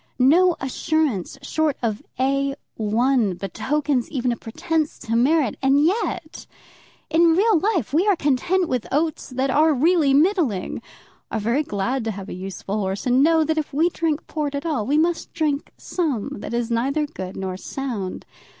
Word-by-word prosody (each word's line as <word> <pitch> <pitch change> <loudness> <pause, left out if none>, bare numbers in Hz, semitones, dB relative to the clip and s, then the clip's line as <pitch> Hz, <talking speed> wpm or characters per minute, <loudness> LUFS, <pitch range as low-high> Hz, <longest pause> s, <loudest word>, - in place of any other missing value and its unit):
No 330 +8 +5
assurance 265 - -1
short 310 +1 0
of 220 -2 -1 0.2
A 275 +1 +1 0.2
1 225 -1 +1
betokens 260 +8 -1
even 255 -4 -1
a - - -1
pretence 315 +7 -2
to 230 -2 -3
merit. 265 +1 +2
And 275 +2 +4
yet 345 -4 -2 0.6
in 330 0 +5
real 410 -1 +4
life 360 - 0
we 345 +7 +3
are 405 - +5
content 330 +5 +1
with 250 -6 -2
oats 310 +2 -1
that 260 +1 -1
are 305 +2 +4
really 310 +1 +3
middling, 300 - +1 0.5
are 220 - -2
very 235 +7 +1
glad 240 0 -2
to 225 - -1
have 195 0 -7
a - - -5
useful 195 +2 -5
horse, 195 0 -3
and 250 +1 +3
know 320 +2 +4
that 315 +1 0
if 300 -2 -5
we 320 +5 +3
drink 320 -3 -2
port 295 -3 -3
at 280 - -4
all 285 -11 -1
we 290 +3 +2
must 335 +1 0
drink 305 -3 -1
some 295 - -2
that 220 - -5
is 240 0 -1
neither 275 +6 +1
good 190 -11 -7
nor 190 -1 -3
sound. 215 -2 -5
275 Hz, 170 wpm, -22 LUFS, 235-320 Hz, 0.6 s, No